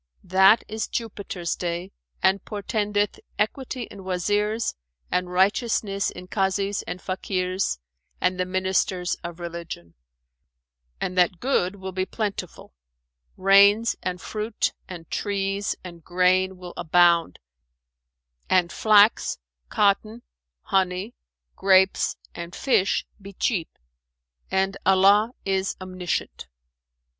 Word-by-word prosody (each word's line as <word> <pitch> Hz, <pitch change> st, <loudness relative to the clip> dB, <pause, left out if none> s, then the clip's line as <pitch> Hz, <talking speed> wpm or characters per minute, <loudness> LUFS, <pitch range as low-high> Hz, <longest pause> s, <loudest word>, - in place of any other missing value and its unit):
"That 190 Hz, +4 st, +5 dB
is 220 Hz, 0 st, -3 dB
Jupiter's 200 Hz, -6 st, -4 dB
day 175 Hz, +2 st, -4 dB, 0.3 s
and 190 Hz, 0 st, +3 dB
portendeth 205 Hz, 0 st, -1 dB, 0.2 s
equity 250 Hz, +4 st, -2 dB
in 200 Hz, -, -10 dB
Wazirs 205 Hz, +4 st, 0 dB, 0.4 s
and 180 Hz, 0 st, 0 dB
righteousness 200 Hz, +1 st, +1 dB
in 180 Hz, 0 st, -10 dB
Kazis 195 Hz, +1 st, 0 dB
and 180 Hz, -, -4 dB
Fakirs 185 Hz, -, -2 dB, 0.4 s
and 180 Hz, 0 st, 0 dB
the 185 Hz, -, +1 dB
Ministers 185 Hz, -1 st, 0 dB
of 170 Hz, 0 st, -7 dB
religion; 170 Hz, -, -7 dB, 1.1 s
and 185 Hz, -, -3 dB
that 180 Hz, 0 st, +3 dB
good 200 Hz, -8 st, +1 dB
will 190 Hz, -1 st, -7 dB
be 185 Hz, 0 st, -2 dB
plentiful: 200 Hz, -5 st, -5 dB, 0.6 s
rains 200 Hz, +4 st, +5 dB
and 180 Hz, -1 st, -3 dB
fruit 215 Hz, +2 st, -2 dB, 0.2 s
and 170 Hz, -3 st, -8 dB
trees 200 Hz, 0 st, -1 dB
and 170 Hz, -2 st, -10 dB
grain 185 Hz, +2 st, +2 dB
will 180 Hz, -1 st, -9 dB
abound, 175 Hz, 0 st, +3 dB, 1.1 s
and 180 Hz, -2 st, +3 dB
flax, 215 Hz, 0 st, +4 dB, 0.3 s
cotton, 215 Hz, +3 st, +1 dB, 0.4 s
honey, 190 Hz, +3 st, 0 dB, 0.4 s
grapes 190 Hz, 0 st, +3 dB, 0.2 s
and 170 Hz, +1 st, -7 dB
fish 205 Hz, -8 st, +2 dB, 0.2 s
be 200 Hz, 0 st, -10 dB
cheap; 185 Hz, -4 st, -1 dB, 0.8 s
and 195 Hz, +1 st, 0 dB
Allah 200 Hz, +4 st, +5 dB
is 195 Hz, 0 st, 0 dB
Omniscient!" 185 Hz, -, -4 dB
190 Hz, 105 wpm, -24 LUFS, 180-205 Hz, 1.1 s, That